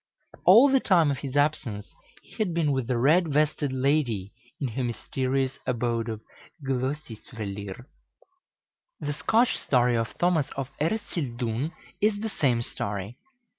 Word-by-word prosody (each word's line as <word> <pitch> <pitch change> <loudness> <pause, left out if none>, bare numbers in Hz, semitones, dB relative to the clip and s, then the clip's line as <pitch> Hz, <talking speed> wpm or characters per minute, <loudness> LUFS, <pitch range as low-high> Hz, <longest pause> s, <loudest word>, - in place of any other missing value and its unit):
All 225 +10 +9
the 270 -1 +4
time 170 - +4
of 135 - -3
his 140 0 -4
absence 145 -8 0 0.3
he - - -19
had 195 -7 -1
been 160 -4 +2
with 130 -4 -1
the 125 -2 0
red 160 +8 +4
vested 150 -1 +1
lady 130 -7 0 0.3
in 135 - -1
her 125 +3 -3
mysterious 130 +2 -1
abode 120 -1 0
of 110 -1 -5 0.4
Glœsisvellir. 115 -6 -4 1.1
The 145 - -3
Scotch 220 - +2
story 125 -2 +2
of 115 -1 -2
Thomas 175 -5 +2
of 135 -1 -3
Ercildoune 140 - -2 0.3
is 210 0 +2
the 220 +1 -3
same 125 - +1
story. 100 +2 -5
135 Hz, 135 wpm, -27 LUFS, 120-155 Hz, 1.1 s, All